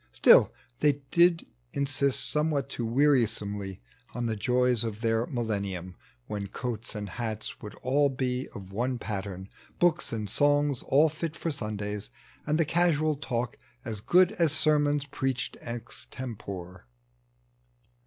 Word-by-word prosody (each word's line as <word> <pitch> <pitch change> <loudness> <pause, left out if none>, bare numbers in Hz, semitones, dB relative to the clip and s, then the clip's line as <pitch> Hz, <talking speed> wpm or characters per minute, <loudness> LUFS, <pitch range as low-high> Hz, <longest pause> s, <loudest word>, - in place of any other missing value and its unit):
StJU - - +7 0.3
they 145 - +4 0.2
did 170 -1 +4 0.3
insist 140 -1 +3
Somewhat 150 -3 +1
too 120 -4 -3
wearisomely 110 -7 +1 0.3
on 120 -1 -2
the 110 -1 -1
joya 125 +4 +2
Of 110 -2 -3
their 115 0 +1
Millennium, 100 -7 -3 0.3
when 100 -1 -4
coats 120 +2 -5
and 105 -1 -4
hats 110 +2 -5
Would 105 - -8
all 140 +3 +3
be 130 -1 -2
of 95 -1 -9
one 125 +5 -1
pattern, 95 -4 -5 0.3
hooks 175 -1 +2
and 110 -2 -3
songs 145 +1 +2
All 150 +4 +5
fit 160 +1 -4
for 165 - -3
Sundays, 105 -5 -3 0.4
and 150 +1 +2
the 165 - +3
casual 155 -2 +2
talk 120 -5 -3 0.3
As 110 -4 -4
good 180 - +5
as 170 -8 +2
sermons 150 -2 +2
preached 135 -2 -2
extempore. 105 - -6
125 Hz, 135 wpm, -28 LUFS, 105-145 Hz, 0.4 s, StJU